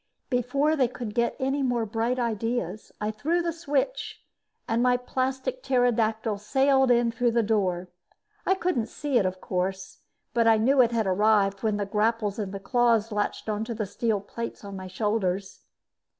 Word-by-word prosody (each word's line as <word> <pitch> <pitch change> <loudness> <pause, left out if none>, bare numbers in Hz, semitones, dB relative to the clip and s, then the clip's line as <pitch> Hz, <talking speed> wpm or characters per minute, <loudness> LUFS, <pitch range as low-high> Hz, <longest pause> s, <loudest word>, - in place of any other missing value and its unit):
Before 275 +5 +1
they 265 -5 +3
could 235 -3 -6
get 235 +1 +1
any 270 +1 0
more 245 -3 +1
bright 225 +4 -1
ideas, 230 -1 -2
I 210 0 -1
threw 320 +11 0
the 335 -1 -1
switch 320 - -2 0.4
and 230 +1 +1
my 250 0 +4
plastic 265 - -2
pterodactyl 225 - +1
sailed 265 +4 +3
in 240 -1 +3
through 235 0 +1
the 235 -1 +3
door. 185 -5 0 0.6
I 380 - +2
couldn't 345 -12 -1
see 285 -4 0
it, 195 - +2
of 185 0 -4
course, 185 +1 -3 0.3
but 230 -1 +3
I 225 -1 +6
knew 260 +5 +4
it 240 -1 +3
had 230 -2 +1
arrived 200 0 +2
when 215 -2 0
the 205 - -1
grapples 210 0 0
in 205 -3 -2
the 195 0 -6
claws 230 +1 +2
latched 210 +1 -2
onto 220 +2 -2
the 215 -1 -2
steel 215 +1 -1
plates 230 +3 -6
on 200 -1 -7
my 185 -1 -7
shoulders. 195 -1 -2
230 Hz, 175 wpm, -26 LUFS, 210-250 Hz, 0.6 s, I